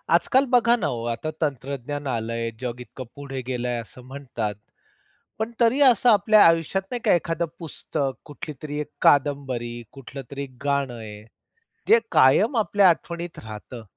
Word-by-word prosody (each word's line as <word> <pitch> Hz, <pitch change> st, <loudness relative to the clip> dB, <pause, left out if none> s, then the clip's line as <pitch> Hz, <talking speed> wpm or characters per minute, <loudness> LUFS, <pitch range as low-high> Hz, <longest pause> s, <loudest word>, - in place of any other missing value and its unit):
आजकाल 255 Hz, +11 st, +3 dB
बघा 240 Hz, -1 st, +5 dB
ना 230 Hz, -, -1 dB
हो 115 Hz, -1 st, -5 dB
आता 135 Hz, +7 st, -4 dB
तंत्रज्ञान 140 Hz, 0 st, -3 dB
आलंय, 115 Hz, 0 st, -2 dB
जग 125 Hz, -1 st, -4 dB
इतकं 130 Hz, +1 st, -9 dB
पुढे 135 Hz, -2 st, -6 dB
गेलंय, 125 Hz, -1 st, -2 dB
असं 115 Hz, +2 st, -12 dB
म्हणतात. 125 Hz, -6 st, -4 dB, 0.8 s
पण 220 Hz, +2 st, -2 dB
तरी 240 Hz, +4 st, +3 dB
असं 245 Hz, +1 st, +4 dB
आपल्या 215 Hz, 0 st, +6 dB
आयुष्यात 165 Hz, +3 st, +3 dB
नाही 245 Hz, -, -2 dB
का -, -, +5 dB
एखादं 170 Hz, -1 st, 0 dB
पुस्तक 145 Hz, -4 st, -4 dB
कुठलीतरी 150 Hz, -1 st, -7 dB
एक 150 Hz, -, -7 dB
कादंबरी, 135 Hz, -4 st, +2 dB, 0.2 s
कुठलं 135 Hz, 0 st, -9 dB
तरी 140 Hz, 0 st, -4 dB
एक 130 Hz, -2 st, -11 dB
गाणं 140 Hz, -3 st, 0 dB
आहे 105 Hz, -2 st, -9 dB, 0.7 s
जे 230 Hz, -, +7 dB
कायम 200 Hz, -, +5 dB
आपल्या 205 Hz, -3 st, +4 dB
आठवणीत 170 Hz, 0 st, -2 dB
राहतं. 110 Hz, +2 st, -9 dB
140 Hz, 150 wpm, -24 LUFS, 125-170 Hz, 0.8 s, जे